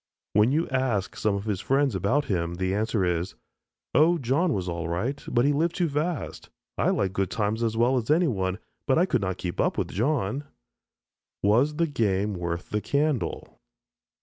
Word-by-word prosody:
When 105 Hz, +4 st, +4 dB
you 160 Hz, +4 st, +1 dB
ask 130 Hz, -7 st, 0 dB
some 105 Hz, -2 st, 0 dB
of 100 Hz, +1 st, -4 dB
his 100 Hz, -3 st, -2 dB
friends 135 Hz, 0 st, +2 dB
about 100 Hz, +11 st, +1 dB
him, 85 Hz, -3 st, -1 dB
the 95 Hz, +1 st, -1 dB
answer 105 Hz, -1 st, 0 dB
is, 90 Hz, +1 st, -1 dB, 0.6 s
"Oh, 170 Hz, +3 st, +5 dB
John 150 Hz, +6 st, +1 dB
was 95 Hz, -9 st, -2 dB
all 85 Hz, -1 st, -3 dB
right, 115 Hz, +12 st, -2 dB
but 120 Hz, +1 st, +2 dB
he 145 Hz, -, +3 dB
lived 160 Hz, +4 st, +1 dB
too 175 Hz, -3 st, +1 dB
fast. 150 Hz, 0 st, -3 dB, 0.3 s
I -, -, +1 dB
like 95 Hz, -1 st, 0 dB
good 95 Hz, -2 st, 0 dB
times 110 Hz, +1 st, -1 dB
as 115 Hz, -1 st, 0 dB
well 125 Hz, +3 st, +3 dB
as 115 Hz, -3 st, -3 dB
anyone, 115 Hz, -, +2 dB, 0.3 s
but 135 Hz, -, +3 dB
I 175 Hz, -, +4 dB
could 125 Hz, -, 0 dB
not 95 Hz, -1 st, -2 dB
keep 90 Hz, -2 st, -3 dB
up -, -, 0 dB
with -, -, -1 dB
John." 130 Hz, -, 0 dB, 1.0 s
Was 120 Hz, +9 st, +3 dB
the 170 Hz, +2 st, +2 dB
game 105 Hz, -8 st, 0 dB
worth 85 Hz, -1 st, -4 dB
the 105 Hz, -, 0 dB
candle? 145 Hz, -1 st, -1 dB
110 Hz, 185 wpm, -26 LUFS, 95-145 Hz, 1.0 s, Oh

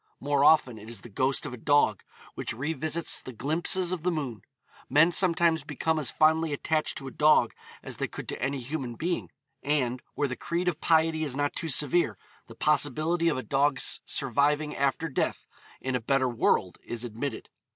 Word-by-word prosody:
More 140 Hz, 0 st, +1 dB
often 135 Hz, -7 st, +4 dB
it 110 Hz, +2 st, -11 dB
is 115 Hz, -4 st, -5 dB
the 120 Hz, -, -11 dB
ghost 130 Hz, +8 st, 0 dB
of 140 Hz, -, -5 dB
a -, -, -7 dB
dog 130 Hz, -6 st, +2 dB, 0.3 s
which -, -, -4 dB
revisits 155 Hz, +5 st, -1 dB
the -, -, -8 dB
glimpses 170 Hz, -, +1 dB
of 185 Hz, -3 st, -3 dB
the 180 Hz, -, 0 dB
moon. 135 Hz, -, -3 dB, 0.5 s
Men 165 Hz, +4 st, +5 dB
sometimes 170 Hz, -3 st, +2 dB
become 155 Hz, +2 st, -1 dB
as 145 Hz, -, -1 dB
fondly 160 Hz, 0 st, +2 dB
attached 155 Hz, +2 st, -1 dB
to 135 Hz, -, -7 dB
a -, -, -6 dB
dog 150 Hz, -6 st, +4 dB, 0.3 s
as -, -, -7 dB
they -, -, -2 dB
could -, -, -8 dB
to -, -, -5 dB
any 135 Hz, +1 st, -1 dB
human 130 Hz, -2 st, -4 dB
being, 170 Hz, +7 st, -2 dB, 0.3 s
and, 130 Hz, -4 st, 0 dB
where 145 Hz, -, 0 dB
the 130 Hz, -, -4 dB
creed 175 Hz, +6 st, -3 dB
of 165 Hz, -3 st, -1 dB
piety 160 Hz, -1 st, +2 dB
is 140 Hz, -4 st, -3 dB
not 145 Hz, 0 st, 0 dB
too 165 Hz, -, -3 dB
severe, 145 Hz, -, +2 dB, 0.3 s
the -, -, -12 dB
possibility 155 Hz, +3 st, +2 dB
of 150 Hz, -, -1 dB
a 130 Hz, -, -4 dB
dog's 140 Hz, 0 st, +1 dB
surviving 145 Hz, +3 st, 0 dB
after 140 Hz, +4 st, 0 dB
death 135 Hz, -, -2 dB, 0.3 s
in 130 Hz, -1 st, -2 dB
a 125 Hz, -, -1 dB
better 135 Hz, +2 st, +1 dB
world 110 Hz, -6 st, +1 dB
is 120 Hz, 0 st, -4 dB
admitted. 120 Hz, +5 st, -5 dB
145 Hz, 190 wpm, -28 LUFS, 130-160 Hz, 0.5 s, Men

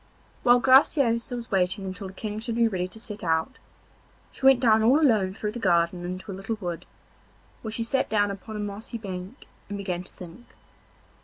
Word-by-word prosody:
While 245 Hz, 0 st, +6 dB
Graciosa 255 Hz, -2 st, +4 dB
was 235 Hz, -1 st, -7 dB
waiting 195 Hz, +1 st, +1 dB
until 190 Hz, +1 st, -6 dB
the 190 Hz, -, -10 dB
King 210 Hz, +1 st, -5 dB
should 230 Hz, 0 st, -4 dB
be 230 Hz, 0 st, +4 dB
ready 185 Hz, -4 st, -2 dB
to 205 Hz, +4 st, -9 dB
set 215 Hz, -3 st, -7 dB
out, 165 Hz, +9 st, 0 dB, 0.7 s
she -, -, -14 dB
went 270 Hz, -2 st, +7 dB
down 220 Hz, -3 st, +4 dB
all 250 Hz, +7 st, +5 dB
alone 215 Hz, -10 st, +2 dB
through 210 Hz, 0 st, -3 dB
the 240 Hz, -, -6 dB
garden 175 Hz, -3 st, +1 dB
into 185 Hz, +3 st, -6 dB
a -, -, -5 dB
little 195 Hz, +4 st, -4 dB
wood, 175 Hz, -4 st, -5 dB, 0.7 s
where 220 Hz, -, -5 dB
she 230 Hz, +1 st, -2 dB
sat 260 Hz, +3 st, 0 dB
down 205 Hz, -1 st, +2 dB
upon 200 Hz, +2 st, -8 dB
a -, -, -4 dB
mossy 205 Hz, +3 st, -5 dB
bank 195 Hz, +3 st, -8 dB, 0.2 s
and 205 Hz, -, -4 dB
began 185 Hz, -3 st, -3 dB
to 180 Hz, -, -12 dB
think. 180 Hz, +7 st, -12 dB
210 Hz, 200 wpm, -26 LUFS, 185-230 Hz, 0.7 s, went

